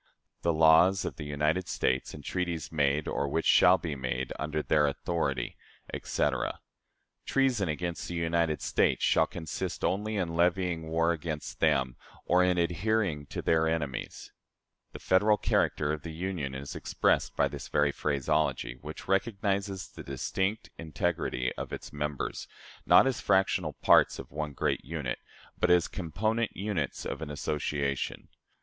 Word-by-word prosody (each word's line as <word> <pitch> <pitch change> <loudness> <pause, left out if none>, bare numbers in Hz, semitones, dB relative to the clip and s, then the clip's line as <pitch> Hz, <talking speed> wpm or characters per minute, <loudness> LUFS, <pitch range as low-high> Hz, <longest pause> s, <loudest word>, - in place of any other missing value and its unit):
" - - -51
"The 85 - +2
laws 80 +4 +5
of - - -4
the 75 - -6
United 75 +5 0
States, 65 0 -1
and 75 - -10
treaties 85 -6 -2
made 75 -1 +1
or 70 - -1
which 80 +4 -1
shall 90 +2 +6
be 85 -4 -4
made 65 -1 -3
under 75 0 -2
their 75 -1 +3
authority," 70 -4 -2 0.4
etc. 70 -3 -1 0.7
"Treason 125 -9 +2
against 85 +2 -3
the 85 - -5
United 85 -2 0
States - - +2
shall - - +4
consist 80 -3 -5
only 105 +3 -1
in 90 -4 -1
levying 85 -1 +1
war 80 +1 +2
against 80 -2 -4
them, 65 -3 +2 0.3
or 90 +1 +4
in 90 0 +2
adhering 85 -2 0
to - - -5
their 80 0 +3
enemies." 75 -5 -3 0.6
The - - -8
Federal 105 +3 +3
character 75 -6 +1
of 75 - -4
the 80 - -7
Union 85 -6 -3
is 70 +1 -6
expressed - - +1
by - - +3
this - - -7
very 75 0 +2
phraseology, 70 -3 -1
which 75 +2 -8
recognizes 100 -1 0
the - - -11
distinct 95 +10 -2
integrity 65 -5 -1
of - - -5
its - - -7
members, 75 -1 -3 0.4
not - - +7
as 135 -2 0
fractional 95 -4 +2
parts - - +4
of - - -9
one 75 0 -4
great - - -1
unit, 75 -5 -4 0.4
but - - +2
as 90 -1 +5
component 110 +6 -2
units 100 -7 -2
of - - -4
an 80 - -5
association. 70 -2 -2
80 Hz, 155 wpm, -29 LUFS, 75-90 Hz, 0.7 s, not